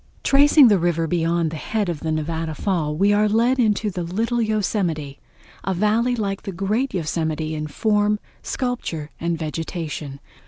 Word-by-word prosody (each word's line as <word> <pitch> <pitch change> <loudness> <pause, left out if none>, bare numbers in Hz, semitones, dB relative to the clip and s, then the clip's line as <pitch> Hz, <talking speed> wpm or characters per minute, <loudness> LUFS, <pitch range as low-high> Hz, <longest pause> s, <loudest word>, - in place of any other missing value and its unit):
Tracing 285 0 +6
the 205 -4 +4
river 165 -1 +1
beyond 165 -1 0
the 160 - -5
head 210 +5 -2
of 170 -4 -3
the 160 - -2
Nevada 160 0 -2
Fall 160 -6 -1
we 200 +5 +3
are 210 +1 +3
lead 235 +5 +2
into 210 -2 +2
the 180 - -4
Little 225 +8 -1
Yosemite, 185 -9 -1 0.4
a 190 - -1
valley 220 +6 +2
like 200 -3 -2
the 200 - -5
great 210 +9 -1
Yosemite 160 -2 -2
in 155 0 -3
form, 210 +5 +1 0.2
sculpture 235 - -3
and 170 0 -1
vegetation. 155 -3 -5
180 Hz, 160 wpm, -22 LUFS, 160-215 Hz, 0.4 s, Tracing